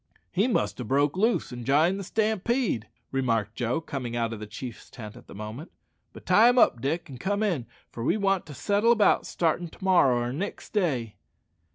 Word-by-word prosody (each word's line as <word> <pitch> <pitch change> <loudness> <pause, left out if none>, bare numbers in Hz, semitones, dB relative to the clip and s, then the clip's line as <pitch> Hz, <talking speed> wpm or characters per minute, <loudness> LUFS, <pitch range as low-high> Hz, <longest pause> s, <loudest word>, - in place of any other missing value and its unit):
"He 200 +6 +2
must 245 - 0
ha' - - -3
broke 140 +6 +1
loose 220 - +1
and 120 -1 -7
jined 155 +9 +3
the - - -4
stampede," 220 - 0 0.2
remarked 115 -6 0
Joe, 120 +5 -1
coming 135 -7 -5
out 115 -1 -1
of 110 - -7
the 105 - -7
chief's 115 +2 -8
tent 110 -4 -9
at 125 - -15
the - - -12
moment; 110 - -7 0.4
"but - - -13
tie 230 +2 +6
him 245 - +2
up, 120 - +4
Dick, 160 +7 -2
and 130 -4 -10
come 200 - -1
in, 170 - -1 0.2
for 115 - -6
we 170 - +2
want 195 -4 0
to 145 - -9
settle 205 - +2
about 220 -3 +3
startin' 170 +1 0
to 165 - -15
morrow 175 -10 +4
or 120 +1 -2
nixt 190 +9 -5
day." 135 - -1
145 Hz, 205 wpm, -27 LUFS, 120-195 Hz, 0.4 s, tie